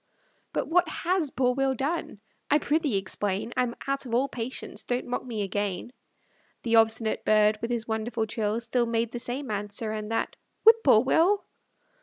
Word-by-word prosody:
But - - -2
what 345 0 +3
HAS 345 -1 0
poor 250 -1 +1
Will 270 0 +1
done? 275 -5 -3 0.3
I 295 - +5
prithee 300 - +1
explain; 195 +3 -2
I'm 245 -1 0
out 275 -1 -1
of 230 - -1
all 265 +3 +2
patience, 245 0 -4
don't 245 0 -2
mock 245 - -3
me 225 -5 -3
again. 200 +3 -3 0.7
The 230 -1 +3
obstinate 225 0 +2
bird, 215 0 +4
with 230 - -3
his 235 -2 -1
wonderful 220 +1 -1
trill, 215 0 -1
Still 240 +1 0
made 230 0 0
the 240 - -5
same 250 +2 -4
answer, 210 +2 -3
and 215 -1 -4
that, 225 - -1 0.3
"Whip 450 +1 +8
poor 225 -5 +6
Will." 350 +9 +3
235 Hz, 175 wpm, -27 LUFS, 215-270 Hz, 0.7 s, Whip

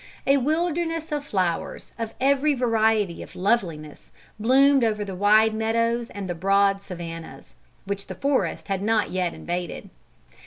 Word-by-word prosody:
A 275 +1 +4
wilderness 330 +3 -1
of 290 -1 -3
flowers, 180 -4 -2
of 225 -1 -4
every 280 +2 +3
variety 220 -6 +1
of - - -11
loveliness, 175 -7 -2 0.3
bloomed 270 +4 +4
over 210 -2 0
the 195 - -6
wide 215 +3 +4
meadows 230 +2 0
and 200 -2 -6
the 175 - -2
broad 195 +3 +2
savannahs, 170 -3 -9 0.3
which 200 0 -4
the - - -7
forest 280 -1 -1
had 195 -2 -2
not 215 +1 +1
yet 180 -2 -1
invaded. 175 0 -5
215 Hz, 145 wpm, -24 LUFS, 190-265 Hz, 0.3 s, A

